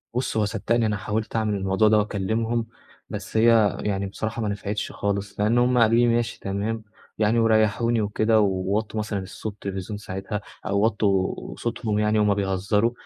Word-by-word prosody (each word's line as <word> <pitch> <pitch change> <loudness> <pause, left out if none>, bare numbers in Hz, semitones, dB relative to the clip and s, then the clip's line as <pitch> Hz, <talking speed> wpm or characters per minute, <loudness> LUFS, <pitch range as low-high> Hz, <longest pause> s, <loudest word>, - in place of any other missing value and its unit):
بُصّ، 125 -2 -1
هو 105 - +3
صدّقني 115 +2 0
أنا 105 -1 0
حاولت 105 +2 -3
أعمل 110 -2 +1
الموضوع 95 +2 +2
ده 105 0 +5
وأكلِّمهم، 110 +3 -1 0.4
بس - - -5
هي 110 -2 +4
يعني 100 -1 -1
بصراحة 110 +4 -4
ما 105 - -1
نفعتش 100 0 -3
خالص 100 0 -3
لإن 105 +3 +2
هم 125 +1 +3
قالوا 115 0 +5
لي: 120 +1 +4
"ماشي، 115 0 0
تمام،" 105 +3 -3 0.3
يعني 110 +2 +2
وريّحوني 115 +1 +3
وكده 110 +2 +2
و 105 - +4
ووطّوا 100 +3 -1
مثلًا 105 -1 -2
الصوت 100 +3 -6
التلفزيون 100 0 -5
ساعتها 100 0 -5 0.2
أو 100 - +1
وطّوا 100 -3 0
صوتهم 115 -3 -2
يعني 105 0 +2
وهُم 105 -1 +3
بيهزّروا، 100 +3 +1
105 Hz, 170 wpm, -24 LUFS, 100-115 Hz, 0.4 s, ده